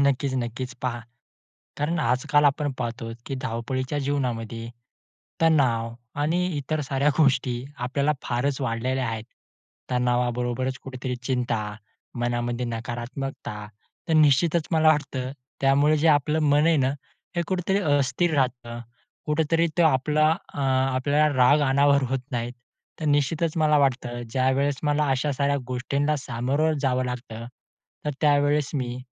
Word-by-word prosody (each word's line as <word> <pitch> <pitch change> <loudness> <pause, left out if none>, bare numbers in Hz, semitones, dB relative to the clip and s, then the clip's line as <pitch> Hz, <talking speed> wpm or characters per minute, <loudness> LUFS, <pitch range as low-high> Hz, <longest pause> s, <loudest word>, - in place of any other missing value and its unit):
नक्कीच, 140 -1 +1
नक्कीच. 125 0 -3
पहा, 120 -2 -2 0.8
कारण 160 +4 0
आजकाल 130 +3 +2
आपण 145 0 +2
पाहतो, 115 -1 -4 0.2
की 135 - -3
धावपळीच्या 130 +4 -2
जीवनामध्ये 120 -5 -2 0.7
तणाव 125 -8 +2 0.3
आणि 170 +5 +1
इतर 150 +2 -2
साऱ्या 135 +1 +1
गोष्टी 125 -4 +2
आपल्याला 140 +4 0
फारच 130 +3 -1
वाढलेल्या 130 +1 -1
आहेत, 110 -1 -4 0.7
तणावाबरोबरच 125 +1 0
कुठेतरी 130 -1 -5
चिंता, 125 -3 -1 0.6
मनामध्ये 120 0 -1
नकारात्मकता. 120 -1 -5 0.4
तर - - +1
निश्चितच 155 +2 +4
मला 160 -1 +4
वाटतं 140 -4 0 0.3
त्यामुळे 140 +3 +4
जे 160 +2 +3
आपलं 150 +1 +3
मन 150 +1 +4
आहे 165 -1 +4
ना, 130 -3 +2 0.5
हे 170 - +2
कुठेतरी 185 +1 0 0.2
अस्थिर 155 +5 +1
राहतं, 120 -4 -1 0.5
कुठेतरी 160 +2 +2
तो - - +6
आपला 150 +2 +3 0.2
अ, - - -4
आपल्याला 135 +2 +2
राग 130 +4 +5
अनावर 140 +1 +4
होत 135 -1 0
नाही. 120 -1 -2 0.5
तर - - -3
निश्चितच 150 +3 +1
मला 150 -1 +4
वाटतं 125 -3 0
ज्यावेळेस 130 +3 +1
मला 150 0 +2
अशा 135 +2 +1
साऱ्या 140 +1 +1
गोष्टींना 140 +4 0
सामोरं 135 +4 0
जावं 130 -2 +1
लागतं, 120 -2 -6 0.6
तर 150 - 0
त्यावेळेस 145 -1 +3
मी 125 -3 -2
135 Hz, 130 wpm, -25 LUFS, 125-150 Hz, 0.8 s, तो